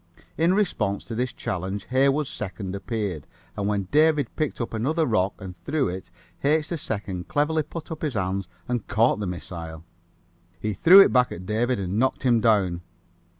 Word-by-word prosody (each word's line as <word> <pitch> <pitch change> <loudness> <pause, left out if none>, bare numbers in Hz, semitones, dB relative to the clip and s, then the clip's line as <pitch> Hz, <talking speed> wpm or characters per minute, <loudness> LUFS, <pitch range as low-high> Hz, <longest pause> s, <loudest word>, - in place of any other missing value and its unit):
In 170 +3 +3
response 110 - 0
to 115 - -7
this 125 +2 -1
challenge 95 +2 -4
Heywood 140 +3 +3
2d 95 -5 -5
appeared, 100 - -4 0.3
and 100 - -2
when 105 -1 0
David 150 -3 +3
picked 155 -2 -2
up 115 - -3
another 155 +9 +1
rock 100 -5 +1
and 95 -3 -8
threw 145 - 0
it 90 0 -6 0.3
H. 150 +2 +2
2d 105 - -4
cleverly 155 +2 +1
put 155 +2 -8
up 160 - -6
his 150 -6 -2
hands 95 -2 -1 0.2
and 120 -3 -2
caught 115 0 +2
the 105 - -2
missile. 85 -3 -7 0.8
He 105 +4 -2
threw 180 - +8
it - - +5
back 125 -1 +4
at 90 - -7
David 115 +4 0
and 95 +2 -2
knocked 130 +1 +1
him 120 -3 +4
down. 100 -6 +2
110 Hz, 175 wpm, -25 LUFS, 95-145 Hz, 0.8 s, threw